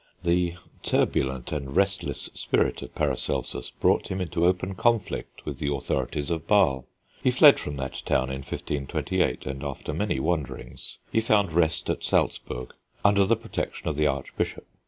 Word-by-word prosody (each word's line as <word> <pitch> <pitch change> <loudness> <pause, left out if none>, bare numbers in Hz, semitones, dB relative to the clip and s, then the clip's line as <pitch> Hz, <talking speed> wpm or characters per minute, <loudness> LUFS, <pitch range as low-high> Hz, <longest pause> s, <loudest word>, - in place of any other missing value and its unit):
The 85 0 +2 0.3
turbulent 65 -2 0
and 70 -3 -4
restless 100 +1 +1
spirit - - +1
of - - -9
Paracelsus - - -1
brought - - +2
him 95 - -3
into 85 -1 +1
open 90 +1 0
conflict 115 +1 0
with - - -5
the 70 - 0
authorities 70 +2 -1
of 80 -3 -2
Basle. 65 -1 +3 0.3
He - - +3
fled - - +7
from 75 - -4
that 65 -1 -4
town 65 0 +1
in 65 - -3
1528, 70 0 -2
and 70 +1 -4
after 70 -2 -4
many - - 0
wanderings, 75 -1 -3
he 110 - +3
found 105 -5 +3
rest 80 -1 +2
at - - -1
Salzburg, 60 0 -1 0.3
under 100 -1 +5
the 115 +4 +4
protection 115 -6 -4
of 75 - -2
the 75 0 +3
archbishop. 70 -1 -2
80 Hz, 155 wpm, -26 LUFS, 70-95 Hz, 0.3 s, fled